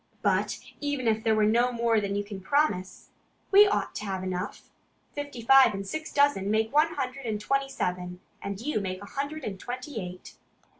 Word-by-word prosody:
"But - - +1 0.2
even 285 -4 -2
if 220 0 +1
there 220 -2 +3
were 215 -1 +3
no 240 +3 +3
more 230 -2 +2
than 200 0 -2
you 205 - 0
can 200 -2 -8
promise, 190 -6 0 0.4
we 410 +1 +8
ought 405 - -1
to 210 - -5
have 190 -2 -3
enough. 185 0 -5 0.4
Fifty 285 -5 -6
five 260 -3 +7
and 195 0 -5
six 315 +10 -5
dozen 280 -9 +3
make 220 +3 +1
one 315 +3 +3
hundred 255 -2 -4
and 215 -2 -1
twenty 275 +5 0
seven; 180 -5 -3 0.2
and 200 -1 -5
you 265 0 -1
make 185 -1 -4
one 205 - -11
hundred 285 +2 -4
and 195 -5 -5
twenty 250 +1 -5
eight." 180 0 -9
225 Hz, 195 wpm, -28 LUFS, 195-275 Hz, 0.4 s, we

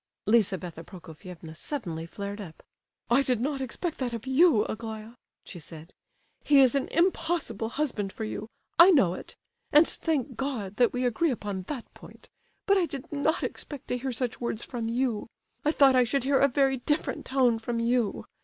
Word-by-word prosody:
Lizabetha 190 -6 +1
Prokofievna 170 -1 -11
suddenly 170 - -4
flared 200 +3 -6
up. 165 -6 -11 0.5
"I 255 +3 +6
did 255 -4 +1
not 275 +2 -2
expect 305 +6 -4
that 250 -3 -2
of 230 0 -5
you, 265 -4 +4
Aglaya," 220 0 -6 0.3
she 175 - -9
said. 160 +1 -11 0.5
"He 285 -1 +5
is 260 -3 +6
an 275 -1 0
impossible 330 - 0
husband 230 -8 -2
for 220 - -6
you,—I 230 - +2
know 235 - +5
it; - - -9 0.4
and 300 +3 +7
thank 285 -6 -2
God 225 -8 -3
that 245 -1 +4
we 250 0 -1
agree 250 +8 +1
upon 205 -6 -3
that 265 -6 -5
point; - - -15 0.4
but 400 -1 +4
I 350 - +1
did 275 -4 -8
not 290 +2 0
expect 290 -4 -6
to 250 - 0
hear 265 +1 -3
such 245 0 -3
words 235 -2 -3
from 230 -2 -4
you. 235 -2 -1 0.4
I 300 - +3
thought 275 -4 +5
I 250 - +6
should 245 +2 0
hear 270 0 +3
a 280 - +5
very 270 0 +2
different 295 +5 -1
tone 255 -4 +2
from 230 +1 -3
you. 235 -2 0
245 Hz, 180 wpm, -28 LUFS, 210-275 Hz, 0.5 s, and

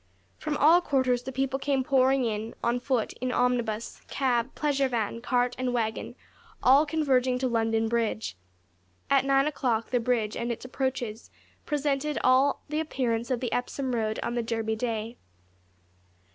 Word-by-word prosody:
From 300 -1 -2
all 330 +4 +6
quarters 260 -6 +1
the 265 - -6
people 270 +1 -1
came 275 -2 0
pouring 265 0 +3
in, 220 0 -3
on 240 +1 +1
foot, 245 -3 -1
in 255 0 -1
omnibus, 240 -3 -1
cab, 255 -2 0
pleasure 280 -2 +1
van, 230 -2 -2
cart, 245 0 +1
and 250 -1 -1
waggon 220 -2 -2 0.5
all 275 +4 +6
converging 260 -5 +2
to 260 0 0
London 225 -1 +1
Bridge. 225 - -1 0.8
At 275 -1 +4
nine 275 0 +3
o'clock 245 -6 -1
the 250 - +2
bridge 230 -3 0
and 235 +1 -2
its 235 - -6
approaches 250 -4 -3 0.4
presented 295 0 0
all 260 +2 +3
the 300 +1 -2
appearance 240 -7 -1
of 255 -3 -1
the 245 -3 -2
Epsom 255 +1 -2
Road 220 -2 -1
on - - -2
the 240 - 0
Derby 225 -1 -2
Day. 225 0 -3
250 Hz, 160 wpm, -27 LUFS, 230-270 Hz, 0.8 s, all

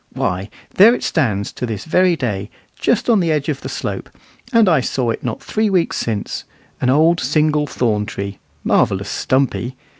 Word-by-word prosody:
Why, 95 +3 -2 0.2
there 225 +6 +7
it - - -6
stands 105 - 0
to 125 - -4
this 105 -3 -5
very 180 +2 +3
day, 105 -8 -3 0.3
just 235 -1 0
on 230 -4 +4
the 170 -3 +1
edge 150 -1 0
of 140 -3 -2
the - - -6
slope, - - -4 0.4
and 230 -4 +5
I 165 -5 +4
saw 125 -1 -1
it - - -5
not 120 -3 -4
three 215 0 0
weeks 185 -4 +1
since 110 -3 -3 0.4
an 125 - +2
old 160 +5 +4
single 150 -1 +1
thorn 105 -6 0
tree, 100 -1 -5 0.2
"marvellous - - +1
stumpy." 130 -1 0
140 Hz, 180 wpm, -19 LUFS, 110-170 Hz, 0.4 s, there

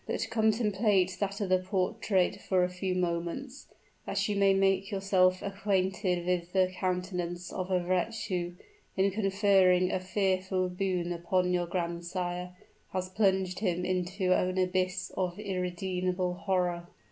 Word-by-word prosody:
"But - - -2
contemplate 210 -4 +2
that 200 -1 -2
other 185 -1 +2
portrait 185 0 0
for 185 -2 +2
a 180 - +1
few 180 0 -3
moments 180 +10 -3 0.4
that - - 0
you 205 - -1
may 200 -1 +4
make 195 0 +2
yourself 190 -2 +2
acquainted 190 -2 0
with 180 -1 -1
the 185 -1 +3
countenance 180 -1 -3
of 185 0 -3
a 180 -2 +1
wretch 185 +6 0
who, 175 -2 -2 0.4
in 195 +1 +3
conferring 195 -3 +3
a - - 0
fearful 185 -1 0
boon 180 -2 -1
upon 180 +1 0
your 175 -1 0
grandsire, 175 +1 -3 0.4
has 185 0 -2
plunged 190 -2 +1
him 180 -3 0
into 185 +1 0
an 185 +1 0
abyss 185 0 0
of 180 -1 -2
unredeemable 180 -1 -2
horror!" 180 -2 -1
185 Hz, 135 wpm, -30 LUFS, 180-195 Hz, 0.4 s, may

